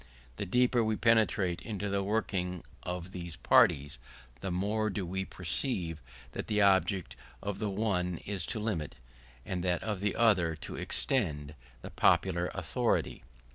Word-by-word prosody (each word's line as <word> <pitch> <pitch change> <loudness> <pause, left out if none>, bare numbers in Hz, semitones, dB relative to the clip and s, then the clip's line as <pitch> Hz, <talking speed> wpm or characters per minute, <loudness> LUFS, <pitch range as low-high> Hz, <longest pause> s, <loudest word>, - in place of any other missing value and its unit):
The - - -3
deeper 125 +3 +3
we 110 0 +1
penetrate 105 -6 +2
into 105 -3 -4
the 100 0 0
working 95 -4 -1 0.2
of 90 0 -5
these 85 -3 -6
parties, 70 -2 +3 0.4
the 95 - -4
more 105 +4 0
do 95 -1 -3
we 95 +2 -3
perceive 85 - -2 0.3
that - - -5
the 105 -1 +1
object 95 - +3 0.3
of 100 -1 -3
the 105 -1 -1
one 95 -4 0
is 100 -4 -2
to 110 - -1
limit, 100 -9 -2 0.5
and 90 -2 -3
that 90 -2 0
of 105 -3 -2
the 100 0 0
other 95 -8 +3
to 75 - -8
extend, 75 - 0 0.3
the - - -7
popular 90 -2 +3
authority. - - 0
95 Hz, 150 wpm, -31 LUFS, 85-105 Hz, 0.5 s, deeper